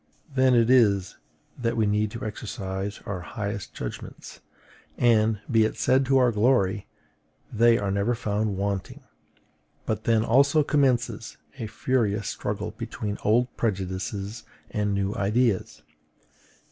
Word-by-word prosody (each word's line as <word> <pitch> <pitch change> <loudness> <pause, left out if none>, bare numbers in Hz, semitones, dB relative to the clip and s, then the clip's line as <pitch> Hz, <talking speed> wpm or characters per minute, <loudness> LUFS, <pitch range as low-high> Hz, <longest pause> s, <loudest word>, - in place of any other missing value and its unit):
Then 130 -1 +4
it 120 +1 +4
is 100 -7 +3 0.4
that 115 -1 -1
we 110 - +3
need 105 +1 +1
to 115 +1 -7
exercise 100 -2 -5
our 100 -3 -4
highest 100 0 -5
judgments; - - -8 0.6
and, 110 -3 +3
be 115 -2 +5
it 110 - -1
said 130 0 +2
to 135 0 +4
our 125 -2 +4
glory, 105 -3 +2 0.7
they 115 +1 +5
are 100 -1 -1
never 100 +5 +1
found 105 -2 -1
wanting: 100 -1 -3 0.8
but 110 -1 -2
then 115 -1 +3
also 140 +6 +4
commences 135 -5 0 0.2
a 110 - -3
furious 110 -3 0
struggle - - -3
between 105 -1 -5
old 120 +4 +2
prejudices 100 +1 -3 0.3
and 105 -1 0
new 100 0 -1
ideas. 105 +1 0
110 Hz, 130 wpm, -26 LUFS, 100-120 Hz, 0.8 s, be